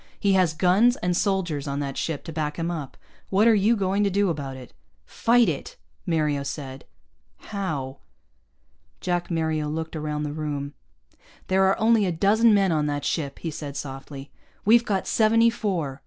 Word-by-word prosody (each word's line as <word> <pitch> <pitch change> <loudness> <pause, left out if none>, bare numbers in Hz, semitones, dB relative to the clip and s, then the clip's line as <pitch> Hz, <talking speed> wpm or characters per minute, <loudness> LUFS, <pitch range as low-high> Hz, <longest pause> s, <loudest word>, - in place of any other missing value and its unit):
He 200 -1 +2
has 185 -4 +3
guns 195 +9 +4
and 180 -6 -1
soldiers 175 -7 -1
on 140 0 -2
that 140 -1 -4
ship 160 -4 -3
to 165 - -8
back 150 -2 -3
him 170 0 -2
up. 145 -6 -6 0.3
What 200 +4 +3
are 230 - +6
you 215 +3 +3
going 200 0 0
to 200 - +2
do 200 -1 +1
about 140 -4 -5
it?" 125 -2 -12 0.3
"Fight 235 0 +3
it," 155 -5 -4 0.3
Mario 150 -4 +1
said. 135 -1 -6 0.5
"How?" 155 -11 -5 1.0
Jack 175 -1 -2
Mario 160 -3 -1
looked 160 +1 -4
around 150 -1 -3
the 145 -1 -4
room. 145 -2 -4 0.8
"There 190 0 +4
are 190 - +2
only 220 -2 +3
a - - 0
dozen 210 +7 +4
men 195 -3 +3
on 150 -2 +1
that 145 -1 -2
ship," 140 -4 -2
he 165 - -5
said 145 -2 -6
softly. 135 0 -8 0.3
"We've 235 +3 +5
got 195 -4 -1
seventy 230 +1 +4
four. 175 - -3
165 Hz, 175 wpm, -24 LUFS, 145-200 Hz, 1.0 s, are